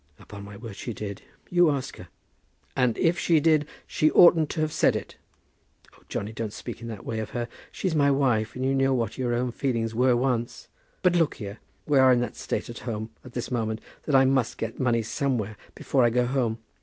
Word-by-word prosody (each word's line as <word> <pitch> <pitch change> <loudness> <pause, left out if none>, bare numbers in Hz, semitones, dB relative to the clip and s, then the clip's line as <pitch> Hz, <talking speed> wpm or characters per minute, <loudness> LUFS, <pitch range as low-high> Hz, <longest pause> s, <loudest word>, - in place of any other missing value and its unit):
"Upon 100 -1 -10
my 100 0 -10
word 110 -2 -8
she 120 +1 -6
did. 100 -2 -6 0.3
You 175 -2 +5
ask 135 -2 -3
her." 90 - -11 0.7
"And 125 -3 +2
if 170 +2 +2
she 165 -2 +3
did, 155 -1 +3 0.2
she 155 - +2
oughtn't 165 -3 +6
to 155 - -2
have 155 0 -1
said - - +3
it." - - -5 0.8
"Oh, - - -22
Johnny, 105 +2 -3
don't 110 -1 -4
speak 115 - -8
in 115 - -6
that 110 -4 -7
way 110 - -3
of 110 -1 -4
her. 120 -1 -2 0.2
She's 185 -4 -2
my 145 -2 +4
wife, 125 -6 +1
and 130 +1 -2
you 135 - +2
know 135 0 +2
what 115 0 -2
your 120 -2 0
own 125 +1 -1
feelings 115 -3 -1
were 125 +2 +3
once. 120 -1 -1 0.3
But 180 -1 +4
look 165 -3 +2
here, 105 -3 -7 0.3
we 145 -3 +3
are 130 -1 +7
in 125 - +4
that 120 - -3
state - - -3
at 120 - -8
home 110 0 -4
at 125 - -12
this 120 - -4
moment, 110 -2 -1 0.3
that 145 - +2
I 135 0 +6
must 130 -3 +1
get 115 0 -5
money 120 -3 +2
somewhere 115 -3 -1 0.2
before 135 -3 +1
I 120 - +5
go 125 +1 +2
home. 120 -3 0
125 Hz, 220 wpm, -26 LUFS, 115-135 Hz, 0.8 s, are